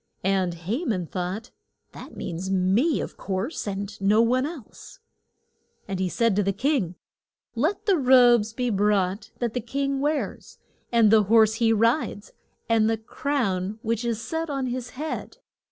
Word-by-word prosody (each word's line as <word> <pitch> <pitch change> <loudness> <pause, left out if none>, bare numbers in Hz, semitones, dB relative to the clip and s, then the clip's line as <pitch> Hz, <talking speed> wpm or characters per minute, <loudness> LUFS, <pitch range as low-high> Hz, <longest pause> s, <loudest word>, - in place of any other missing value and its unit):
And 190 -2 +1
Ha 200 - -3
man 200 - -1
thought, 185 +6 -5 0.4
That - - -11
means 175 +3 -5
me, 195 - +2
of - - -7
course, 195 - -3
and 200 +1 -5
no 205 +3 +4
one 250 +4 +3
else. 315 - -11 0.9
And 195 -2 -3
he 185 -1 0
said 230 0 +1
to - - +4
the 195 0 +1
king, 210 - 0 0.6
Let 310 - -1
the 395 -4 +3
robes 245 -4 +5
be 245 +1 -2
brought 200 -1 +1
that 235 -3 -2
the 245 - -2
king 275 +4 -2
wears, 295 +1 -2 0.3
and 230 -3 +5
the 215 -2 +5
horse 220 +1 +5
he 225 -1 +4
rides, 225 -1 +1 0.4
and 225 -1 +3
the 225 - +1
crown 215 -5 -2
which 230 +1 -1
is 230 -2 -1
set 320 +8 -3
on 275 -2 -2
his 250 0 -4
head. 310 +2 -5
225 Hz, 160 wpm, -25 LUFS, 195-255 Hz, 0.9 s, robes